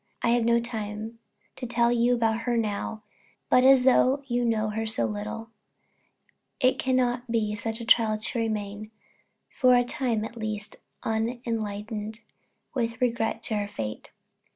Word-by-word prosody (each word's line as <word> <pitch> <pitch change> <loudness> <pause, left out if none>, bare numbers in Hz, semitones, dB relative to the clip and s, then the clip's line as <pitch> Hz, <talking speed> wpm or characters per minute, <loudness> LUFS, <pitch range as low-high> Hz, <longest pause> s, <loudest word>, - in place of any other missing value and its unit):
I - - +3
have 240 0 +3
no 235 0 +4
time 220 -1 -5 0.4
to 250 - -5
tell 235 0 +2
you 240 +1 +3
about 225 -1 +1
her 240 - +2
now; 215 0 -2 0.5
but 250 - +6
as 260 -1 +6
you 260 -1 +3
know 220 -2 +1
her 220 +1 -2
so 165 - 0
little, 105 - -5 1.1
it 255 -2 +3
cannot 250 -1 +1
be 220 -2 0
such 220 +2 -3
a 230 - -6
trial 225 -2 +4
to 215 +2 -2
remain, 215 -1 -3 0.7
for 255 -2 +5
a 245 - +4
time 240 -3 -1
at 235 - -8
least, 215 -2 -4 0.3
unenlightened 220 -1 -3 0.5
with 230 -3 -2
regard 230 -2 0
to 215 - -1
her 205 0 -1
_fate. 110 - -5
225 Hz, 150 wpm, -27 LUFS, 215-240 Hz, 1.1 s, but